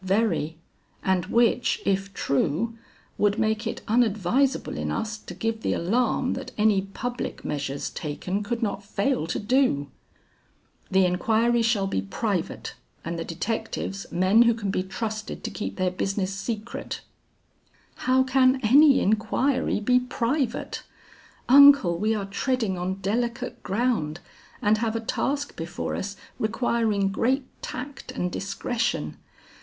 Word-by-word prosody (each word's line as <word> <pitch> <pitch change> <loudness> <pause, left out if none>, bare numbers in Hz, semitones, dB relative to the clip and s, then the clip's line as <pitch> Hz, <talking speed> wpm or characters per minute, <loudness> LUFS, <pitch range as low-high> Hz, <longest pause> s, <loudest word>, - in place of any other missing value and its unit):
"Very, 185 -5 +1 0.5
and 185 -2 +1
which, 235 +2 +2
if 195 0 0
true, 160 - 0 0.4
would 205 0 +3
make 220 0 0
it - - -4
unadvisable 230 +3 +2
in - - -3
us 220 -1 -2
to - - -10
give 225 0 -2
the - - 0
alarm 240 +7 +1
that - - -6
any 210 -2 +4
public 240 +6 -5
measures 140 -1 -3
taken 180 +6 -3
could 235 +3 -2
not 205 -1 -2
fail 205 - 0
to - - -2
do." 205 - +1 1.0
"The 190 0 +4
inquiry 225 +6 +2
shall 225 -3 +2
be 145 - -1
private, 95 - -3 0.3
and 170 0 -3
the - - -2
detectives, 195 +2 -3
men 185 +6 +4
who 235 -1 +5
can 205 -4 -2
be 185 - 0
trusted 215 +3 -5
to 230 - -3
keep 210 - -4
their 185 -1 0
business 195 +1 -1
secret." 215 +3 -5 1.1
"How 260 +1 +5
can 260 0 +3
any 275 +5 +6
inquiry 220 +5 +1
be 250 +4 +3
private? 250 +1 -2 0.7
Uncle, 280 -9 +8
we 220 +1 +1
are 200 -2 -2
treading 220 0 -1
on 180 +1 -2
delicate 235 +5 -2
ground, 195 -8 0 0.4
and 210 +1 +3
have 225 -1 -1
a - - 0
task 285 +5 -2
before 165 +1 -4
us 200 +1 -4 0.2
requiring 220 -3 +1
great 255 +7 +1 0.2
tact 260 +2 -6
and 180 0 -2
discretion. 225 +5 -2
215 Hz, 135 wpm, -25 LUFS, 190-240 Hz, 1.1 s, Uncle